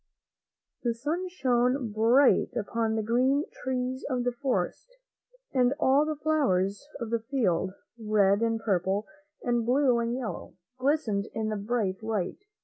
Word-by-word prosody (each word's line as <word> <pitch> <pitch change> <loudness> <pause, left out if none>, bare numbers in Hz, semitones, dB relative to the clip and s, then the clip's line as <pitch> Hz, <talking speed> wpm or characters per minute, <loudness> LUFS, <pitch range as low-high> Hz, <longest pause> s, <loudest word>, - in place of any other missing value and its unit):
The 235 -2 0
sun 310 +10 -2
shone 250 -6 +1
bright 235 +6 +4
upon 225 +1 -1
the 220 - 0
green 255 +6 +2 0.2
trees 255 0 -2
of 250 -2 0
the 245 - +1
forest, 250 - -3 0.6
and 255 0 +3
all 280 +3 +4
the 310 - -1
flowers 280 -8 0
of 230 -1 -5
the 230 - +1
field, 215 -7 0 0.3
red 205 -1 +3
and 225 -1 +1
purple 195 -1 0 0.4
and 240 -1 +1
blue 250 0 +3
and 235 +1 -1
yellow, 250 -4 -5 0.2
glistened 255 -7 +1
in 220 -1 -1
the 215 - -1
bright 205 -2 -1
light. 215 -5 -2
235 Hz, 140 wpm, -28 LUFS, 215-265 Hz, 0.6 s, bright